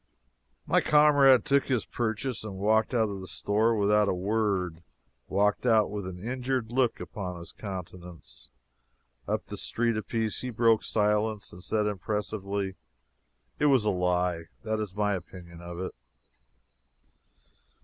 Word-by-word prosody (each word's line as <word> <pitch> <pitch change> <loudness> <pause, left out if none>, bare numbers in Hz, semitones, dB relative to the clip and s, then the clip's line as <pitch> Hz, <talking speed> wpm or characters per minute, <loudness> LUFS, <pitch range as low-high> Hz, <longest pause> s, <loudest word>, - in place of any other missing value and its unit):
My - - +3
comrade 145 -4 +6
took 140 0 +3
his 125 -5 0
purchase 115 +1 -2
and 100 -3 -6
walked 110 +3 +2
out 115 -3 +2
of 100 -1 -5
the 95 - -8
store 110 +5 +1
without 105 0 +3
a - - +1
word 95 -4 -1 0.5
walked 100 +2 +1
out 110 -4 +3
with 100 -3 -4
an 90 -1 -6
injured 125 +2 -2
look 125 -1 +1
upon 90 -4 -6
his 85 - -9
countenance. 90 - -9 0.8
Up - - -1
the - - -7
street 115 -1 0
apiece 110 0 -2
he 125 - -4
broke 115 -1 +3
silence 105 0 0
and 90 - -11
said 105 0 0
impressively: 100 -1 -3 0.8
"It 150 - +4
was 130 -6 +4
a 105 - +3
lie 90 -2 0 0.2
that 110 -1 -1
is 105 -3 -4
my 105 0 +1
opinion 85 -2 -8
of 85 0 -7
it!" 95 - -4
105 Hz, 145 wpm, -28 LUFS, 95-115 Hz, 0.8 s, comrade